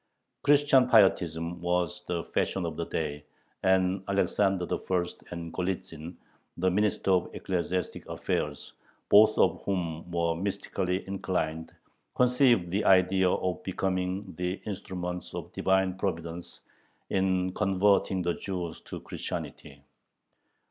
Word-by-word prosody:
Christian 145 -3 +5
pietism 85 -4 +3
was 90 0 -1
the 85 -2 -2
fashion - - -1
of - - -4
the - - -4
day, 75 -2 -3 0.4
and 95 0 +2
Alexander 100 -1 +1
I. 95 - -2 0.3
and 85 -1 -6
Golitzin, 90 -2 -4 0.4
the 95 +1 +2
Minister 100 0 +1
of 90 -2 +2
Ecclesiastic 90 0 -2
Affairs, - - -3 0.4
both 110 +1 +7
of - - +3
whom 85 -4 -3
were 85 -1 +1
mystically 95 0 -2
inclined, 90 -5 -2 0.4
conceived 125 -7 +3
the 100 +3 0
idea 95 0 +5
of 90 0 -1
becoming 95 +1 -2
the 90 +1 -2
instruments 90 -3 -5
of - - -7
Divine 95 -1 +1
Providence 85 -2 -4 0.5
in 95 -1 +1
converting 95 -1 +2
the 85 0 +1
Jews 90 -4 -5
to - - -7
Christianity. 70 -1 -6
90 Hz, 115 wpm, -28 LUFS, 85-95 Hz, 0.5 s, both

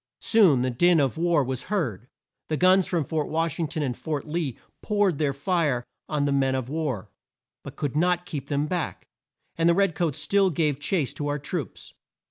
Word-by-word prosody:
Soon 180 - +4
the 130 - 0
din 175 +7 +4
of 135 -3 +1
war 165 -2 +2
was 130 0 -4
heard. 125 - -2 0.4
The 155 - -1
guns 185 +2 +4
from 165 -5 0
Fort 155 +2 -2
Wash 165 -1 -1
ing 165 - 0
ton 155 +1 -3
and 125 -4 -2
Fort 150 0 -4
Lee 155 -5 -3 0.2
poured 205 -7 +1
their 150 -3 +2
fire 140 -4 0 0.2
on 150 -2 0
the 140 - +1
men 135 -1 +2
of 130 -1 -3
war, 145 -10 -3 0.5
but - - -9
could 145 -2 -3
not 175 +2 +2
keep 145 -8 -6
them 145 0 0
back, 170 +1 -3 0.5
and 165 +1 +4
the 170 - +4
red 195 -2 +2
coats 160 -2 -1
still 190 +6 +2
gave 150 -4 0
chase 150 -2 0
to 145 - -4
our 145 0 -1
troops. 145 0 -5
155 Hz, 200 wpm, -25 LUFS, 140-175 Hz, 0.5 s, Soon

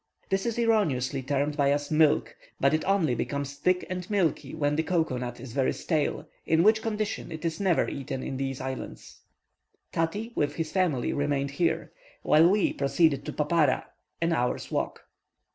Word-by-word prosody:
This 195 +3 0
is 235 - -2
erroneously 155 - +1
termed 145 +2 -1
by 140 -1 +3
us 145 +1 -1
"Milk," 155 -1 +3 0.2
but 140 +2 +3
it 155 - +1
only 190 -9 +2
becomes 140 +2 -3
thick 180 +5 +1
and 180 +1 -5
milky 190 -9 0
when 145 -2 +1
the 160 - +2
cocoa 160 -6 0
nut 125 -1 -5
is 120 -1 -9
very 135 -1 +1
stale, 155 -4 -1 0.2
in 160 +1 +3
which 220 +2 +5
condition 215 -5 -3
it 160 0 -6
is 165 -1 -2
never 190 -4 +2
eaten 135 -1 -4
in 135 - -4
these 135 -1 -3
islands. 130 -1 -7 0.7
Tati, 205 +8 -2
with 145 - 0
his 165 -2 -3
family, 170 -10 +1
remained 140 -1 0
here, 165 +4 0 0.3
while 160 +3 +6
we 205 +1 +2
proceeded 140 0 +2
to 150 - -3
Papara, 150 -2 +2 0.3
an 165 0 +1
hour's 125 -5 -1
walk. - - -2
155 Hz, 175 wpm, -27 LUFS, 140-180 Hz, 0.7 s, while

